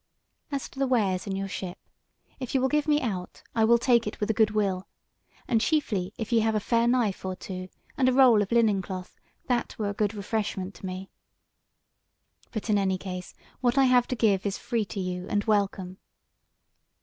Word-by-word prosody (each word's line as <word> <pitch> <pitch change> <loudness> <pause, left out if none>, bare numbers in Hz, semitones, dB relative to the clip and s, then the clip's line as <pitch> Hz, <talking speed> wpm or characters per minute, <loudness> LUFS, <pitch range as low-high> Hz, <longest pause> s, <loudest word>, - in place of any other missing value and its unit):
As 280 -1 -2
to 270 - -12
the 275 - +2
wares 205 -7 +1
in 195 - -2
your 195 0 -2
ship, 185 -1 -5 0.6
if 255 0 -4
ye - - +5
will 265 +1 +2
give 300 +2 +1
me 295 -1 +4
aught 185 -6 -4
I 225 - +2
will 235 +2 +6
take 235 -2 +3
it 210 - -5
with 210 +1 +1
a - - -1
good 220 -1 +4
will; 200 -3 -1 0.6
and 230 -3 +2
chiefly 215 - 0
if 225 0 -5
ye 230 - +5
have 220 0 +1
a - - +3
fair 230 +3 +2
knife 240 -5 +1
or 185 0 -3
two 185 0 -7 0.3
and 255 -1 +5
a - - +2
roll 250 -5 +6
of 200 - -3
linen 220 -4 +3
cloth, 185 -1 -7 0.3
that 245 -2 -1
were 210 -2 -1
a - - -2
good 210 +1 -1
refreshment 205 -2 -3
to 190 - -8
me. 185 +1 -6 1.4
But 215 -2 -4
in 210 -2 +3
any 190 -1 +1
case 180 -1 -7 0.2
what 245 +1 +1
I 270 - +6
have 250 -2 +4
to 255 - -2
give 205 -5 +2
is 200 -1 -2
free 230 -3 -1
to 200 - -6
you 180 -1 -3
and 205 0 +1
welcome." 195 -3 0
210 Hz, 210 wpm, -27 LUFS, 190-240 Hz, 1.4 s, will